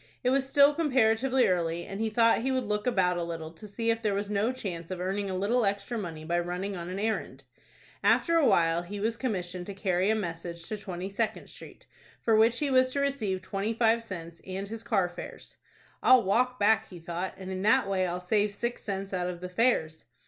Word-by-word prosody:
It 250 - +2
was 270 0 +1
still 285 +1 +6
comparatively 260 -4 +2
early, 170 -2 0
and 195 - -7
he 225 - +1
thought 230 +1 +3
he 265 +3 0
would 260 -1 0
look 210 +1 -2
about 185 -7 +2
a - - -1
little 165 -1 -5
to 170 +6 -11
see 230 +3 -1
if 225 0 -2
there 210 -3 0
was 205 +1 -3
no 210 +4 +1
chance 175 -10 -6
of 185 -1 -4
earning 195 +2 -2
a 185 - -2
little 230 +6 +1
extra 200 +4 -1
money 170 -8 -5
by 175 +2 +1
running 180 +3 -3
on 175 -1 -6
an 185 - -4
errand. 220 +2 -2 0.6
After 335 - +3
a 325 -3 +4
while 170 -4 +3
he 200 +4 -7
was 225 +3 0
commissioned 180 -7 -3
to 200 - -6
carry 190 0 +1
a 220 - +3
message 170 -3 -5
to 215 - -3
Twenty 185 -1 -5
Second 215 +2 -2
Street, - - -12 0.3
for 225 - +2
which 225 +2 +4
he 290 0 0
was 255 0 +4
to 280 - 0
receive 235 -10 -1
twenty 205 +3 -2
five 230 0 +3
cents, 170 -6 -8
and 190 +1 -4
his 225 +1 -6
car 210 -6 +1
fares. 175 0 -10 0.4
"I'll 255 -2 +6
walk 250 +6 +1
back," 215 +2 +3
he 180 - -10
thought, 175 +2 -5
"and 190 0 -7
in 185 0 -3
that 220 +3 +4
way 190 -2 +1
I'll 175 +1 -3
save 205 +3 +1
six 235 +4 -3
cents 195 -1 -4
out 180 -1 -1
of 180 -1 -5
the 180 +1 -6
fares." 180 - +1
200 Hz, 225 wpm, -28 LUFS, 180-230 Hz, 0.6 s, still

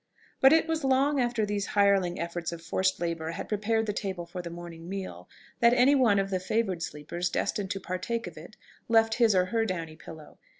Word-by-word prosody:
But 270 - +7
it 320 0 +4
was 320 -2 -1
long 270 +2 +2
after 240 -3 +1
these 205 -1 -2
hireling 195 -3 +3
efforts 170 0 -3
of 170 -1 -8
forced 185 +3 0
labour 165 -2 -3
had - - -6
prepared 220 +2 0
the 210 - -2
table 190 -4 -4
for 180 +1 -7
the 170 - -7
morning 170 0 -9
meal, 185 - -6 0.3
that 235 0 +5
any 255 +3 +5
one 245 -7 +4
of 195 0 0
the 185 - 0
favoured 190 -2 -1
sleepers 170 +4 -4
destined 200 +2 -2
to 195 +1 -3
partake 190 +6 -3
of 175 - -8
it 165 +7 -12 0.3
left 225 -1 +4
his 225 -4 +5
or 180 -1 +4
her 225 -1 +2
downy 165 -6 -4
pillow.... 160 -1 -12
195 Hz, 210 wpm, -28 LUFS, 170-225 Hz, 0.3 s, But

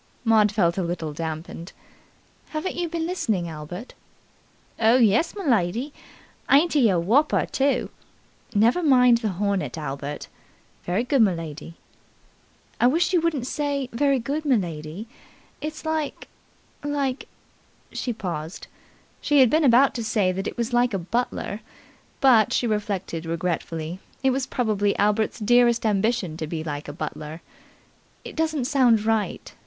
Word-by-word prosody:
Maud 215 -2 +4
felt 185 -4 +1
a - - +1
little 170 -3 -3
damped. 160 +2 -6 0.8
"Haven't 310 +4 -3
you 345 -1 -2
been 330 -1 -2
listening, 220 - -1
Albert?" 165 - -8 0.9
"Oh, 225 +1 +5
yes, 235 +7 +3
m'lady! 245 - 0 0.6
Ain't 310 +5 +5
he 265 -7 +4
a 185 - +2
wopper, 240 - +2
too?" 275 +1 0 0.6
"Never 230 +11 +4
mind 250 -6 +5
the 220 -2 -1
hornet, 200 -1 -1
Albert." 145 -1 -5 0.6
"Very 185 +6 0
good, 270 0 +2
m'lady." 165 -5 -1 1.0
"I 240 - +5
wish 335 +7 +2
you 350 - +4
wouldn't 310 -7 -1
say 280 -1 -2
'Very 275 +3 +2
good, 280 +6 -3
m'lady'. 175 - -2 0.6
It's 310 +1 -6
like 315 -2 -3 0.6
like 280 -2 -2 0.3
" - - -35
She 250 - -2
paused. 170 -6 -5 0.6
She 290 -1 +3
had 255 -3 +6
been 315 +1 +3
about 260 +1 +5
to 235 - -4
say 210 -4 +1
that 195 +2 -3
it - - -6
was 235 +1 -2
like 240 -2 +2
a - - +1
butler, 215 +2 -3 0.6
but, 240 -6 +5
she - - +1
reflected 200 -6 -2
regretfully, 165 0 -3 0.2
it 265 - +4
was 260 0 -1
probably 205 -4 0
Albert's 210 +2 +1
dearest 240 +1 +3
ambition 210 -5 0
to 155 - -4
be 160 0 -4
like 145 -2 -5
a - - -5
butler. 155 +1 -6 0.8
"It - - -8
doesn't 315 -5 0
sound 245 -6 +3
right. 220 -1 -1
225 Hz, 145 wpm, -24 LUFS, 175-270 Hz, 1.0 s, had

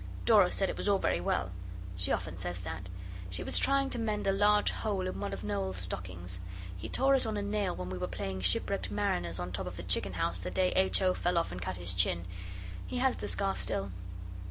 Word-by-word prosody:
Dora 205 -5 +7
said 195 - +1
it - - -3
was - - 0
all 200 - +5
very 85 - +1
well. 90 0 0 0.4
She 90 0 0
often 85 - -1
says 90 0 -4
that. 85 +2 -6 0.4
She 90 -1 -2
was - - +6
trying 275 0 +2
to 245 - +2
mend 215 -2 -1
a 195 - +4
large 205 +1 +4
hole 200 -4 -1
in 185 - -3
one 100 0 -2
of 100 -1 -5
Noel's 100 -2 -1
stockings. 90 0 -4 0.4
He 90 - -6
tore 270 +1 +4
it 265 -4 +3
on 215 -1 -1
a 205 - -1
nail 205 -2 0
when 90 0 -5
we 90 - -4
were 90 - -1
playing 95 +1 -4
shipwrecked 90 -1 +2
mariners 85 0 0
on 90 0 -4
top 95 0 -3
of 90 0 -6
the 85 - -5
chicken 90 +1 0
house 90 0 +1
the 90 0 -3
day 185 - +2
H. 190 +1 +3
O. 185 -1 +4
fell 175 -1 0
off 170 - +1
and 90 +1 -5
cut 90 +1 -2
his 90 0 -2
chin: 90 -1 +3 0.6
he - - -3
has 260 0 +2
the - - -4
scar 195 -1 0
still. 95 0 -1
95 Hz, 235 wpm, -32 LUFS, -, 0.6 s, Dora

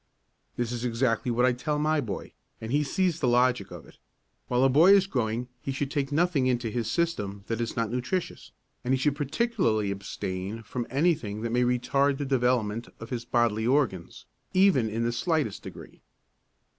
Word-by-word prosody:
This 120 -1 -2
is 120 -1 -4
exactly 120 0 0
what 120 +1 +2
I 130 - +3
tell 135 +5 -2
my 155 0 +1
boy, 100 -5 -6 0.3
and 110 +1 -6
he 145 +2 +3
sees 175 +3 0
the 130 - +1
logic 125 -4 +2
of 85 -3 -10
it: - - -19 0.5
While 125 +1 +2
a - - +6
boy 160 +9 +6
is 195 -1 +5
growing 120 - -2
he 135 - -3
should 135 +1 -3
take 140 -2 -1
nothing 155 -4 +2
into 120 -3 0
his 115 -1 -2
system 105 - -1
that 115 0 -2
is 115 - -3
not 115 -1 -1
nutritious 130 +9 -3 0.3
and 130 +1 +2
he - - 0
should 140 +2 +1
particularly 145 - 0
abstain 100 +2 -5
from 120 +2 -4
anything 135 -8 0
that 115 - -2
may 120 +1 +2
retard 135 +3 +2
the 145 - -3
development 125 -4 0
of 115 - -9
his 120 -2 -3
bodily 115 -2 +1
organs, 125 - 0 0.3
even 185 - +4
in 115 +2 -2
the 120 - +1
slightest 140 - -1
degree. - - -11
125 Hz, 185 wpm, -27 LUFS, 115-145 Hz, 0.5 s, a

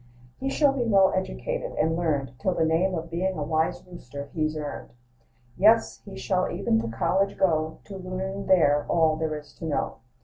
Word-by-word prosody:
"He 270 - -2
shall 280 0 +3
be 270 - -2
well 195 -4 +4
educated - - -3
and 160 +1 +1
learned, 150 -6 -1
Till 185 -2 0
the 160 - +2
name 175 +4 +2
of 165 0 -5
being 185 +2 -1
a 150 - -2
wise 160 +2 0
rooster 140 -5 -9
he's 155 -1 -1
earned: 150 -1 -6 0.7
Yes, 220 +4 +4
he 200 - -9
shall 180 +9 0
even 110 0 +1
to 115 - -4
college 190 +12 0
go, 160 -3 +1
To 195 - -9
learn 190 +1 -5
there 150 -6 +4
all 160 -2 +3
there 155 -1 -2
is 150 - -12
to - - -5
know. 150 -3 -2
170 Hz, 190 wpm, -26 LUFS, 155-190 Hz, 0.7 s, well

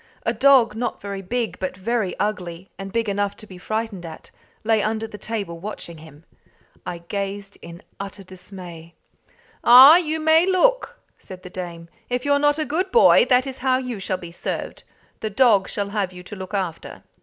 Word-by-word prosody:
a - - 0
dog, 265 -6 +5
not 240 +2 -3
very 200 -1 -6
big 230 +4 -3
but 185 0 -4
very 210 -1 -2
ugly, 185 -3 -4
and 195 0 -6
big 230 +1 -1
enough 200 0 -1
to - - -9
be 185 -3 -12
frightened 215 -1 -4
at, 160 -2 -10 0.3
lay 220 -1 +2
under 220 +1 -1
the 220 - -10
table 205 -6 -5
watching 170 -4 -7
him. 155 -1 -15 0.6
I 170 -1 -6
gazed 200 0 -5
in 170 0 -11 0.2
utter 200 0 -7
dismay. 180 -3 -11 0.7
"Ah, 260 +7 +10
you 320 -2 -1
may 320 +3 +4
look!" 485 +6 +2 0.2
said 185 -1 -11
the 180 - -10
dame. 170 -2 -7 0.2
"If 250 +1 -2
you're 285 0 +3
not 290 0 +3
a 310 - -1
good 360 +6 -1
boy, 470 - +6
that 255 0 +3
is 265 -1 -6
how 255 0 +2
you 250 -4 -5
shall 190 -1 -2
be 170 -2 -10
served. 170 - -5 0.4
The 220 - -3
dog 210 -4 +3
shall 200 -1 -3
have 200 -3 -2
you 180 0 -11
to 195 - -9
look 190 +1 -6
after." 185 -5 -5
205 Hz, 190 wpm, -22 LUFS, 185-250 Hz, 0.7 s, Ah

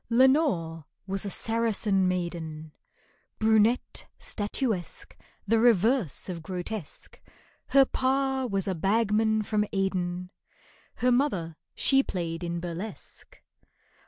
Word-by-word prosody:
LENORE 230 - +2 0.2
was 195 +1 -2
a - - -2
Saracen 215 -3 +1
maiden, 165 -4 -4 0.7
Brunette, 220 +2 +2
statuesque, 210 -3 -3 0.3
The 225 +2 +2
reverse 225 - +3
of 175 -3 -5
grotesque, 180 +1 -7 0.5
Her 275 -1 +6
pa 265 0 0
was 195 -3 -2
a 190 - 0
bagman 215 +4 +1
from 210 0 0
Aden, 180 -2 -2 0.6
Her 250 +1 +1
mother 200 - 0 0.2
she 270 -1 +4
played 170 -7 -4
in 170 0 -3
burlesque. 180 - -8
200 Hz, 100 wpm, -27 LUFS, 175-230 Hz, 0.7 s, Her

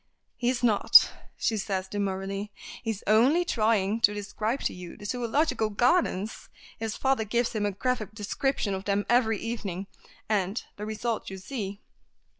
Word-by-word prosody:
"He's 245 0 0
not," 220 -4 +7 0.3
says 220 -4 0
she 190 -1 -1
demurely. 195 0 -2 0.3
"He 235 - -4
is 215 -2 -3
only 260 +11 +4
trying 220 - +2
to 210 -1 +4
describe 215 +5 -2
to - - -1
you 180 -1 -9
the 205 - -10
Zoological 245 +1 0
Gardens. 225 - +1 0.3
His 220 -1 -3
father 265 -4 +2
gives 235 +3 0
him 210 -2 0
a - - -1
graphic 215 0 -2
description 215 +1 -1
of 190 0 -4
them 205 0 +1
every 230 -2 +3
evening, 200 -5 -4 0.4
and 200 0 0
the 210 +1 -6
result 220 +1 -2
you 190 - -6
see." 200 0 -5
215 Hz, 155 wpm, -28 LUFS, 200-240 Hz, 0.4 s, not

